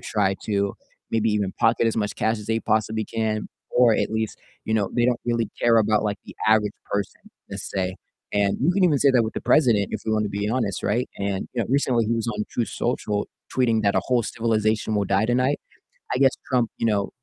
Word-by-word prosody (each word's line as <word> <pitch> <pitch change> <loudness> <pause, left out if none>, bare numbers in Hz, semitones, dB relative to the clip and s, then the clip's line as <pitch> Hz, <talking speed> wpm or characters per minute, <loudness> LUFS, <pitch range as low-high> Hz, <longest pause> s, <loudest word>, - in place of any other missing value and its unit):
try 105 -5 0
to 100 -2 0 0.4
maybe 115 0 +2
even 100 -3 0
pocket 115 0 +3
as 115 - 0
much 105 -2 -1
cash 110 0 0
as 105 - -10
they 115 0 +1
possibly 110 0 0
can, 110 -1 -2 0.2
or 120 -2 +5
at - - 0
least, 110 -1 -2 0.3
you 110 - 0
know, 105 -3 +1
they 120 - +3
don't 125 -1 +1
really 115 -2 0
care 115 -1 +5
about, 110 -1 +3
like, 105 -1 -1
the - - -11
average 105 -1 +3 0.2
person, 100 -2 -2 0.3
let's - - -6
say, 95 -1 -1 0.4
and 100 -1 +2
you 160 +7 +3
can 195 +1 +1
even 160 -6 +4
say 140 - +5
that 125 -2 +4
with 110 - -3
the - - -4
president, 120 -10 +3
if - - -2
we 110 - -1
want 110 -1 +1
to - - -2
be 100 +1 -2
honest, 115 -5 -1
right? 120 +5 0
And, 100 -1 -2
you 125 - -1
know, - - -4
recently 125 -3 +2
he 110 - 0
was 115 -1 -1
on 105 -2 -2
Truth 120 - -2
Social 105 -4 -2 0.3
tweeting 115 -4 +2
that 100 -1 +2
"a - - +3
whole 125 -3 +1
civilization 110 -1 0
will 100 - +1
die 100 +2 +1
tonight." 125 +4 +1 0.5
I - - +1
guess 135 0 +5 0.2
Trump, 125 -4 +2
you - - -1
know, 100 -3 +1
110 Hz, 230 wpm, -24 LUFS, 105-120 Hz, 0.5 s, or